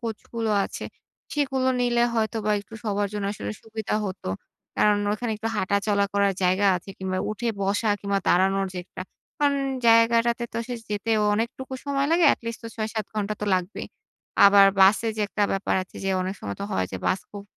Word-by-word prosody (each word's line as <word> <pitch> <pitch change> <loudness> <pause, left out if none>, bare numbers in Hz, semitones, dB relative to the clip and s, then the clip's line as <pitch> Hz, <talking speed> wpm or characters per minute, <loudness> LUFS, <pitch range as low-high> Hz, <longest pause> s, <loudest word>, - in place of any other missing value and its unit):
কোচগুলো 230 -1 -4
আছে - - -6 0.5
সেগুলো 265 -3 0
নিলে 240 -1 +2
হয়তো 225 0 0
বা 215 - +1
একটু 225 +2 -14
সবার 205 -1 0
জন্য 205 -1 -3
আসলে 105 - -5
সুবিধা 220 -1 -4
হতো। 185 - -6 0.5
কারণ 210 -1 +4 0.2
ওখানে 230 +1 -3
একটু 225 +1 -3
হাঁটাচলা 200 +1 +1
করার 200 -1 +2
জায়গা 185 +3 +3
আছে 180 - -10
কিংবা 185 0 -2
উঠে 230 +3 -3
বসা 205 +3 0
কিংবা 200 0 0
দাঁড়ানোর 195 +2 +3
যে - - -4
একটা, 185 - -8 0.4
কারণ 285 -1 +2 0.3
জায়গাটাতে 230 +1 +4
তো - - -27
আসলে 245 +1 -5
যেতে 210 +2 -2 0.2
অনেকটুকু 235 +5 -3
সময় 280 0 0
লাগে। 335 0 +4
at - - -32
least 230 0 -5
তো 230 - -6
৬-৭ 220 -1 -2
ঘণ্টা 210 0 -1
তো - - -1
লাগবেই। 180 +2 -3 0.6
আবার 200 0 +8
বাসে 205 +4 +5
যে - - -2
একটা 210 - -1
ব্যাপার 195 0 -1
আছে 185 - -14
যে - - 0
অনেক 190 +2 -3
সময় 100 -1 -5
তো - - -2
হয় 95 - 0
যে - - -2
বাস 190 - +1
খুব 205 -1 -8
210 Hz, 190 wpm, -25 LUFS, 195-230 Hz, 0.6 s, আবার